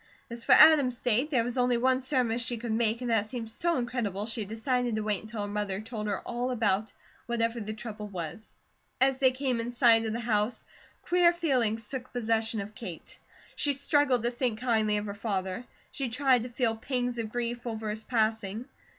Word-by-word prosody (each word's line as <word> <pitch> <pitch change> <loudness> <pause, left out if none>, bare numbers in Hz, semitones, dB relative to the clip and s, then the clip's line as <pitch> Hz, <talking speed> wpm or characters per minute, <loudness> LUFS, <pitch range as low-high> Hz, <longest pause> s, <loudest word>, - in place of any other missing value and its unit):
As 235 0 -6
for 260 - +5
Adam's 280 -4 +7
state, 245 +5 +1
there 250 -7 +2
was 245 +2 -3
only 245 -1 +3
one 260 +2 +2
surmise 250 -3 0
she 240 0 -3
could 230 0 -4
make, 225 +1 +1
and 245 -1 -2
that 220 -2 +2
seemed 225 -1 -6
so 340 +7 0
incredible, 240 -5 -2
she 225 -1 -2
decided 240 +2 -1
to 215 - -1
wait 210 -2 0
until 220 -1 -5
her - - -3
mother 205 -2 -2
told 215 -1 -5
her 205 - -2
all 245 +1 -3
about 220 -4 0 0.4
whatever 235 0 0
the 215 -1 -4
trouble 215 -1 -7
was. 185 +2 -7 0.4
As 265 0 +3
they 260 - +6
came 255 -2 -1
in 230 +1 -3
sight 240 -2 +5
of 215 - -2
the 230 - -2
house, 220 0 0 0.4
queer 350 -1 +4
feelings 250 -10 0
took 255 0 -5
possession 225 -2 0
of 205 +2 -8
Kate. 195 -9 -8 0.4
She 285 - +1
struggled 275 -3 +2
to 240 - +1
think 240 -3 -1
kindly 220 -4 +1
of 210 - -3
her 200 - -4
father; 200 0 -3 0.3
she 270 -3 -2
tried 255 0 +3
to 245 - -5
feel 235 -2 0
pangs 245 +1 -2
of 220 -2 -3
grief 240 0 -3
over 220 -2 -3
his 215 +1 -5
passing. 220 -1 -1
235 Hz, 200 wpm, -29 LUFS, 215-250 Hz, 0.4 s, Adam's